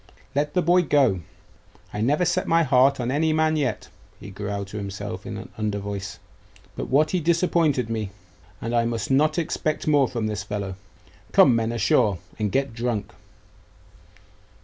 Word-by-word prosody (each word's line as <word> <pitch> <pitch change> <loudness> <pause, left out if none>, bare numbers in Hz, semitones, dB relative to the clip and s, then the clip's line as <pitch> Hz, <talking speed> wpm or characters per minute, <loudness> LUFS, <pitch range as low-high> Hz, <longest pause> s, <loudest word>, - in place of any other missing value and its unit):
'Let 150 +3 -1
the 180 - +3
boy 175 +2 +4
go. 135 - +2 0.7
I 105 - -3
never 150 +9 +2
set 175 - 0
my 165 0 +4
heart 135 -1 +4
on 120 0 -1
any 155 +3 +2
man 155 0 +2
yet,' 135 -7 -2 0.3
he 100 - -10
growled 100 +1 -4
to 105 - -7
himself 100 -1 -6
in - - -5
an - - -9
under 105 -1 -1
voice, 100 0 -5 0.6
'but - - -5
what 150 +3 +3
he 185 - +1
disappointed 165 -6 +2
me 110 -3 -3 0.5
and 115 - -3
I 120 - +3
must 115 +1 -2
not 155 +4 +3
expect 155 -2 -1
more 145 -3 +4
from 115 -3 -3
this 105 -1 -2
fellow. 100 -1 -4 0.6
Come, 120 - +6
men, 115 0 0
ashore, 105 -4 +2 0.2
and 105 -2 0
get 135 0 0
drunk! 115 -2 -2
125 Hz, 170 wpm, -24 LUFS, 105-155 Hz, 0.7 s, Come